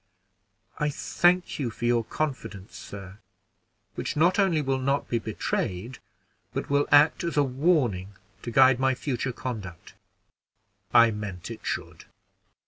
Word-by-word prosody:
"I 150 Hz, -1 st, +1 dB
thank 175 Hz, +4 st, +1 dB
you 130 Hz, -5 st, -1 dB
for 115 Hz, +2 st, -6 dB
your 120 Hz, -1 st, +2 dB
confidence, 115 Hz, -9 st, -5 dB
sir, 100 Hz, 0 st, -10 dB, 0.7 s
which -, -, -4 dB
not 175 Hz, +6 st, +3 dB
only 190 Hz, -5 st, +3 dB
will 135 Hz, -2 st, 0 dB
not 140 Hz, +2 st, 0 dB
be 120 Hz, -, 0 dB
betrayed, 110 Hz, +2 st, -3 dB, 0.6 s
but -, -, -3 dB
will 145 Hz, 0 st, +2 dB
act 150 Hz, +4 st, +5 dB
as 170 Hz, -3 st, -3 dB
a 145 Hz, -, +5 dB
warning 125 Hz, -, +1 dB, 0.3 s
to -, -, -5 dB
guide 130 Hz, +1 st, +5 dB
my 130 Hz, 0 st, +2 dB
future 130 Hz, -1 st, -2 dB
conduct." 105 Hz, -9 st, -7 dB, 1.0 s
"I 115 Hz, -1 st, +6 dB
meant 105 Hz, -2 st, -6 dB
it 115 Hz, -, -9 dB
should. -, -, -5 dB
130 Hz, 135 wpm, -26 LUFS, 110-145 Hz, 1.0 s, I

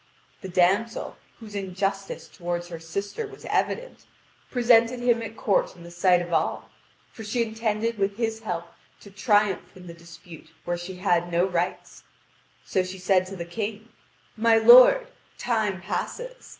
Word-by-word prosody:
The 190 Hz, -, -7 dB
damsel, 190 Hz, +6 st, +1 dB, 0.2 s
whose 220 Hz, -3 st, -11 dB
injustice 195 Hz, 0 st, -3 dB
toward 175 Hz, -1 st, -4 dB
her 170 Hz, -2 st, -8 dB
sister 200 Hz, -, -5 dB
was 410 Hz, 0 st, -13 dB
evident, -, -, -2 dB, 0.4 s
presented 240 Hz, -1 st, +3 dB
him 240 Hz, -1 st, +2 dB
at 225 Hz, 0 st, -7 dB
court 200 Hz, -3 st, +1 dB
in 170 Hz, -, -14 dB
the 170 Hz, -, -11 dB
sight 175 Hz, 0 st, +3 dB
of 170 Hz, 0 st, -7 dB
all, -, -, -1 dB, 0.4 s
for 220 Hz, -, -10 dB
she 235 Hz, +3 st, 0 dB
intended 220 Hz, 0 st, -2 dB
with 200 Hz, +1 st, 0 dB
his 225 Hz, -1 st, -2 dB
help 175 Hz, -6 st, -4 dB, 0.4 s
to 200 Hz, -, -14 dB
triumph 205 Hz, -2 st, +1 dB
in 180 Hz, -, -13 dB
the 170 Hz, -, -9 dB
dispute 170 Hz, 0 st, -14 dB, 0.2 s
where 175 Hz, -, -1 dB
she 175 Hz, +2 st, -7 dB
had 175 Hz, -2 st, 0 dB
no 170 Hz, +2 st, +2 dB
rights. 180 Hz, -1 st, -3 dB, 0.6 s
So 190 Hz, -, +1 dB
she 185 Hz, +1 st, -6 dB
said 185 Hz, 0 st, +2 dB
to 195 Hz, -, -8 dB
the 170 Hz, -2 st, -6 dB
King: 215 Hz, +5 st, -5 dB, 0.5 s
"My 225 Hz, +1 st, +4 dB
lord, 245 Hz, -, +8 dB, 0.3 s
time 215 Hz, -5 st, -1 dB
passes. -, -, -5 dB
200 Hz, 160 wpm, -25 LUFS, 175-225 Hz, 0.6 s, lord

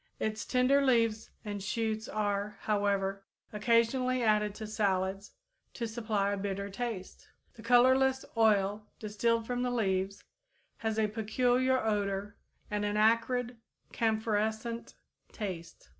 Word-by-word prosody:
Its 215 Hz, -1 st, -2 dB
tender 265 Hz, +2 st, +3 dB
leaves 230 Hz, -4 st, +2 dB, 0.2 s
and 205 Hz, -1 st, -4 dB
shoots 220 Hz, +2 st, -2 dB
are, 205 Hz, -1 st, -2 dB
however, 200 Hz, -2 st, 0 dB, 0.3 s
occasionally 235 Hz, +3 st, +2 dB
added 210 Hz, -2 st, +2 dB
to 220 Hz, -, -6 dB
salads, 195 Hz, -2 st, -1 dB, 0.4 s
to 235 Hz, -, -3 dB
supply 215 Hz, -3 st, -1 dB
a 200 Hz, -, -1 dB
bitter 200 Hz, 0 st, -3 dB
taste. 220 Hz, -4 st, -5 dB, 0.3 s
The 225 Hz, -, -13 dB
colorless 260 Hz, +3 st, +4 dB
oil 210 Hz, -2 st, +2 dB
distilled 225 Hz, +2 st, 0 dB
from 245 Hz, +1 st, -2 dB
the 250 Hz, -, 0 dB
leaves 195 Hz, -4 st, -1 dB, 0.5 s
has 220 Hz, -1 st, -2 dB
a 220 Hz, -, +3 dB
peculiar 245 Hz, +4 st, +1 dB
odor 205 Hz, -2 st, -1 dB, 0.4 s
and 210 Hz, 0 st, -1 dB
an 205 Hz, 0 st, -1 dB
acrid, 230 Hz, +3 st, +2 dB, 0.4 s
camphorescent 220 Hz, +1 st, -1 dB, 0.4 s
taste. 170 Hz, -, -7 dB
215 Hz, 120 wpm, -31 LUFS, 205-235 Hz, 0.5 s, colorless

